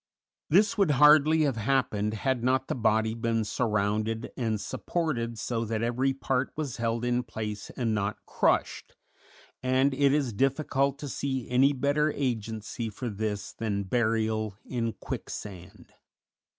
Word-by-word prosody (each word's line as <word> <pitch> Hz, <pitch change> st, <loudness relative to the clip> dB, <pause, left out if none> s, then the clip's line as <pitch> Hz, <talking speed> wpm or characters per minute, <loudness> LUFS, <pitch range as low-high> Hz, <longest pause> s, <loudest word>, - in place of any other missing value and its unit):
This 205 Hz, +6 st, +4 dB
would 195 Hz, -5 st, +4 dB
hardly 150 Hz, +2 st, +6 dB
have 135 Hz, -5 st, 0 dB
happened 110 Hz, -3 st, 0 dB
had 130 Hz, +1 st, -1 dB
not 130 Hz, +1 st, +1 dB
the -, -, -1 dB
body 110 Hz, -2 st, +1 dB
been 115 Hz, -1 st, -1 dB
surrounded 110 Hz, 0 st, -1 dB
and 110 Hz, -4 st, -1 dB
supported 115 Hz, -, -2 dB
so 115 Hz, +2 st, -2 dB
that 110 Hz, 0 st, -2 dB
every 125 Hz, +3 st, +1 dB
part 135 Hz, -1 st, -1 dB
was 145 Hz, -5 st, -4 dB
held 115 Hz, 0 st, -1 dB
in 125 Hz, 0 st, +1 dB
place 110 Hz, -3 st, -6 dB
and 115 Hz, -4 st, 0 dB
not 105 Hz, 0 st, -1 dB
crushed, -, -, 0 dB, 0.7 s
and 130 Hz, +2 st, +2 dB
it 140 Hz, +1 st, +3 dB
is 140 Hz, -5 st, +1 dB
difficult 135 Hz, +3 st, +1 dB
to 145 Hz, -, -6 dB
see 130 Hz, -2 st, -3 dB
any 135 Hz, +3 st, +5 dB
better 145 Hz, +3 st, +1 dB
agency 115 Hz, -3 st, -3 dB
for 120 Hz, +4 st, -5 dB
this 105 Hz, -1 st, -3 dB
than 100 Hz, -3 st, -2 dB
burial 110 Hz, -1 st, 0 dB
in 115 Hz, -3 st, -2 dB
quicksand. 90 Hz, -4 st, -8 dB
120 Hz, 140 wpm, -28 LUFS, 110-135 Hz, 0.7 s, hardly